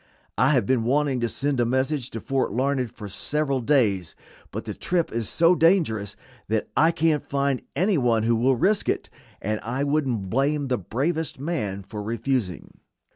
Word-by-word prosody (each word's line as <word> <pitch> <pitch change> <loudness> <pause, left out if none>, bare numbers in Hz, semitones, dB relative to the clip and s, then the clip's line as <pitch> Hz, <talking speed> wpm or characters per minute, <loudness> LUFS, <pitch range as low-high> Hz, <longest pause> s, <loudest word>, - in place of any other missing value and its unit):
I 125 +7 +3
have 125 -7 +2
been 125 0 +2
wanting 135 +1 +1
to 120 -1 0
send 140 +2 -1
a - - +4
message 130 +1 0
to 115 - -6
Fort 135 +3 -1
Larned 130 +1 0
for 105 -1 -9
several 140 +7 -1
days, 110 - +1 0.3
but - - -6
the - - -4
trip 175 -2 -1
is 115 -2 -2
so 170 +1 +4
dangerous 160 - +2 0.3
that 110 0 0
I 155 +5 +5
can't 160 -2 +1
find 140 -2 0
any 190 -2 +2
one 115 -3 +2
who 115 +1 +3
will 130 +4 +3
risk 200 - +1
it, - - -2 0.3
and 105 +1 -1
I 125 +5 -2
wouldn't 135 -10 -1
blame 140 +2 +1
the 125 - +1
bravest 145 - -2
man 110 - -3
for 105 +2 -7
refusing." 115 -3 -3
130 Hz, 180 wpm, -24 LUFS, 115-150 Hz, 0.3 s, I